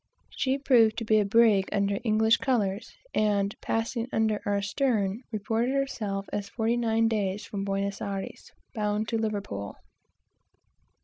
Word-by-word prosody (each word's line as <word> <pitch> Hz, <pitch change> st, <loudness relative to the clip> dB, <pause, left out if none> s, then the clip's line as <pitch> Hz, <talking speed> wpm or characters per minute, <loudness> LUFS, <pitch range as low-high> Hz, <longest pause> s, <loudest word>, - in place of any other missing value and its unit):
She 265 Hz, 0 st, 0 dB
proved 240 Hz, -6 st, +4 dB
to 230 Hz, -, -3 dB
be 215 Hz, 0 st, +4 dB
a 210 Hz, -, +2 dB
brig 210 Hz, -2 st, +4 dB
under 200 Hz, 0 st, 0 dB
English 220 Hz, 0 st, +3 dB
colors, 210 Hz, -5 st, -1 dB, 0.2 s
and 205 Hz, -1 st, +1 dB
passing 230 Hz, +1 st, -2 dB
under 220 Hz, -1 st, +1 dB
our 200 Hz, 0 st, +1 dB
stern, 210 Hz, -1 st, 0 dB
reported 225 Hz, +4 st, -1 dB
herself 210 Hz, -8 st, -2 dB
as 200 Hz, -1 st, -3 dB
forty 225 Hz, +2 st, 0 dB
nine 225 Hz, -1 st, +2 dB
days 205 Hz, -3 st, -1 dB
from 200 Hz, -1 st, -4 dB
Buenos 195 Hz, 0 st, -2 dB
Ayres, 195 Hz, -1 st, -5 dB, 0.2 s
bound 210 Hz, -1 st, -1 dB
to 225 Hz, -, 0 dB
Liverpool. 200 Hz, -, -3 dB
215 Hz, 140 wpm, -27 LUFS, 200-230 Hz, 0.2 s, proved